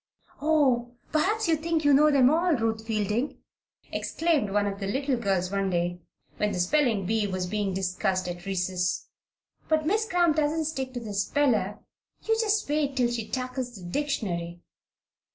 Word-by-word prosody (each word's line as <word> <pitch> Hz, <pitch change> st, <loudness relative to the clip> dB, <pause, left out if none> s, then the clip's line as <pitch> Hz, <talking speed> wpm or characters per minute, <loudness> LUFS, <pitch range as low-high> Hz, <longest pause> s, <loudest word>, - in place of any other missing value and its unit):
"Oh, 260 Hz, -6 st, +2 dB, 0.2 s
perhaps 410 Hz, +8 st, +1 dB
you 325 Hz, -, +4 dB
think 320 Hz, 0 st, -1 dB
you 290 Hz, -, +6 dB
know 300 Hz, +2 st, +6 dB
them 270 Hz, -2 st, +5 dB
all, 335 Hz, +1 st, +3 dB
Ruth 225 Hz, -2 st, -2 dB
Fielding!" 220 Hz, +4 st, -1 dB, 0.5 s
exclaimed 320 Hz, -10 st, 0 dB
one 205 Hz, +1 st, +1 dB
of 200 Hz, -1 st, -3 dB
the 195 Hz, -, -3 dB
little 270 Hz, +5 st, 0 dB
girls 195 Hz, -5 st, 0 dB
one 195 Hz, -1 st, 0 dB
day 175 Hz, 0 st, -1 dB, 0.4 s
when 210 Hz, 0 st, 0 dB
the 185 Hz, -, -3 dB
spelling 225 Hz, 0 st, +2 dB
bee 215 Hz, +1 st, +1 dB
was 185 Hz, -1 st, -2 dB
being 205 Hz, +1 st, -1 dB
discussed 185 Hz, 0 st, -1 dB
at 175 Hz, +1 st, -6 dB
recess. 180 Hz, -1 st, -1 dB, 0.6 s
"But 310 Hz, -1 st, +2 dB
Miss 430 Hz, +6 st, +1 dB
Cramp 345 Hz, -3 st, +3 dB
doesn't 310 Hz, +1 st, +1 dB
stick 265 Hz, -4 st, -3 dB
to -, -, -2 dB
the 220 Hz, -3 st, -6 dB
speller. 210 Hz, -2 st, +1 dB, 0.4 s
You 445 Hz, -, +2 dB
just 430 Hz, -1 st, +1 dB
wait 290 Hz, -2 st, 0 dB
till 245 Hz, -2 st, +2 dB
she 230 Hz, -2 st, -3 dB
tackles 255 Hz, -1 st, -4 dB
the 180 Hz, -4 st, -9 dB
dictionary." 175 Hz, -9 st, -2 dB
240 Hz, 170 wpm, -27 LUFS, 195-300 Hz, 0.6 s, you